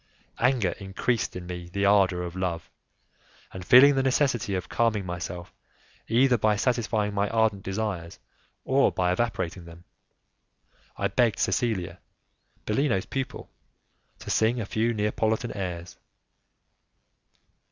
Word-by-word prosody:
Anger 120 -7 +2
increased 100 +4 -2
in 90 -1 -6
me 90 -1 -7
the 100 +2 0
ardour 95 -3 +3
of 90 0 -6
love, 90 -3 -3 0.8
and 95 - -8
feeling 130 +9 +8
the 135 - +1
necessity 130 -6 +1
of 90 -3 -4
calming 110 -4 0
myself 90 0 -6 0.5
either 125 +1 +3
by 105 0 +3
satisfying 110 -3 0
my 100 0 0
ardent 110 -3 +1
desires 95 -4 -4 0.5
or 135 +1 +3
by 90 -1 0
evaporating 90 -4 -2
them, 85 +1 -13 1.1
I - - 0
begged 115 -5 +1
Cecilia, 110 -8 -1 0.7
Bellino's 105 -4 0
pupil, 135 +1 -5 0.7
to - - -6
sing 115 +3 +2
a 110 - -3
few 110 +3 0
Neapolitan 110 +1 -1
airs. 90 -3 -5
105 Hz, 120 wpm, -26 LUFS, 90-120 Hz, 1.1 s, feeling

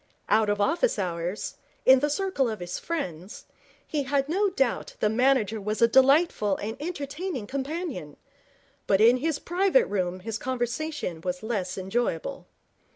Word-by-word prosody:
Out 215 -1 +4
of 205 0 0
office 330 - +2
hours, 175 0 -3 0.3
in 260 0 +8
the 295 +3 +1
circle 295 -6 0
of 215 -2 -4
his 175 0 -5
friends, 190 - -5 0.4
he 300 - -1
had 275 0 0
no 395 +6 +2
doubt 270 -10 -1
the 210 - +2
manager 225 -2 +2
was 210 +2 -2
a 230 - +6
delightful 265 - +4
and 220 +2 -4
entertaining 300 - -4
companion; 275 - -4 0.7
but 195 - +3
in 235 +3 +6
his 305 +3 -1
private 385 +9 +2
room 185 -2 -2
his 220 +1 -4
conversation 255 - -3
was 180 +2 -3
less 205 -6 -2
enjoyable. 240 - -2
245 Hz, 150 wpm, -26 LUFS, 205-300 Hz, 0.7 s, in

